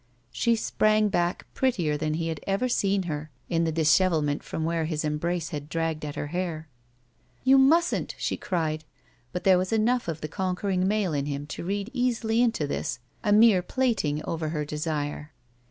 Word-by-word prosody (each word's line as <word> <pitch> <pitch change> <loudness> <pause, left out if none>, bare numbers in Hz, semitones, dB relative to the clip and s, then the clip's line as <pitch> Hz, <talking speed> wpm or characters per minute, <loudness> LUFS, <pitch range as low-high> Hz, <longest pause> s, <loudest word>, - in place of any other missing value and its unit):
She 235 - +2
sprang 215 -1 +2
back 175 -2 0
prettier 180 - +1
than 155 +1 -1
he 165 0 -2
had 160 -2 -3
ever 195 +6 +1
seen 200 -5 +1
her 155 -3 -4 0.2
in 165 0 +1
the 160 - 0
dishevelment 160 -2 +2
from 160 - -4
where 165 -1 0
his 155 -1 -2
embrace 165 +2 -1
had 145 -1 -6
dragged 165 -2 -2
at 145 -1 -5
her - - -3
hair. 170 -3 -3 0.8
"You 270 +1 +6
mustn't," 330 +6 +3
she - - -1
cried, 155 -4 -2 0.5
but 180 - -4
there 185 -2 +5
was 185 +3 -2
enough 230 +1 +2
of 165 -2 -4
the 155 - -3
conquering 185 +1 -1
male 205 -4 +1
in 140 -1 -1
him 145 0 -3
to - - -6
read 200 +4 -3
easily 235 -2 +1
into 230 -10 +1
this 140 -3 -3 0.3
a 205 - +1
mere 210 -3 +6
plating 180 - 0
over 160 -1 -2
her 150 -2 -2
desire. 150 0 -3
170 Hz, 180 wpm, -26 LUFS, 155-210 Hz, 0.8 s, You